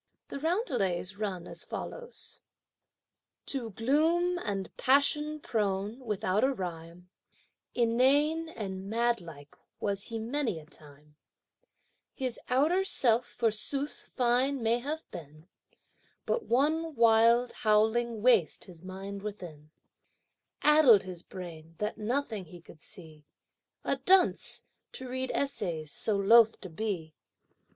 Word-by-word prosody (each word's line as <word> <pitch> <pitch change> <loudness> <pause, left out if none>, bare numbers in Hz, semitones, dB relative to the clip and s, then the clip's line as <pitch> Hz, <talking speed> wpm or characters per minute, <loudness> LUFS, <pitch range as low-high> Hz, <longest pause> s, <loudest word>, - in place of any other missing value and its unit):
The 280 - -5
roundelays 200 - -1
run 195 -5 -3
as - - -3
follows: - - -7 1.0
To 255 -5 -3
gloom 320 - +1
and 195 - -4
passion 295 +3 +2
prone, 210 -2 -2
without 210 -4 -1
a 270 - +4
rhyme, 175 -4 -7 0.6
Inane 280 +7 +3
and 195 - -6
madlike 195 -11 -2 0.2
was 200 -1 -2
he 230 - -5
many 235 - -1
a 155 - -14
time, 150 -2 -15 1.0
His 255 -3 -3
outer 310 +9 +3
self, 240 -9 +2
forsooth, 240 +5 -2
fine 250 +1 +2
may 230 +2 +2
have 300 +5 -4
been, 155 0 -11 0.8
But 460 -4 -1
one 310 +5 +1
wild, 230 +1 +5
howling 220 +1 +1
waste 230 -10 +4
his 175 -2 -10
mind 195 +2 -7
within: 175 -8 -8 0.9
Addled 300 -9 +7
his 180 -2 -7
brain 165 -4 -10
that 210 +1 -3
nothing 220 -3 -2
he 175 +2 -12
could 165 -2 -15
see; 155 -7 -6 0.6
A 275 - 0
dunce! 365 +7 +3 0.3
to 260 - -6
read 260 +1 -3
essays 170 - -2
so 210 +5 0
loth 225 +3 +6
to 185 - -9
be! 170 -4 -3
225 Hz, 115 wpm, -30 LUFS, 185-270 Hz, 1.0 s, Addled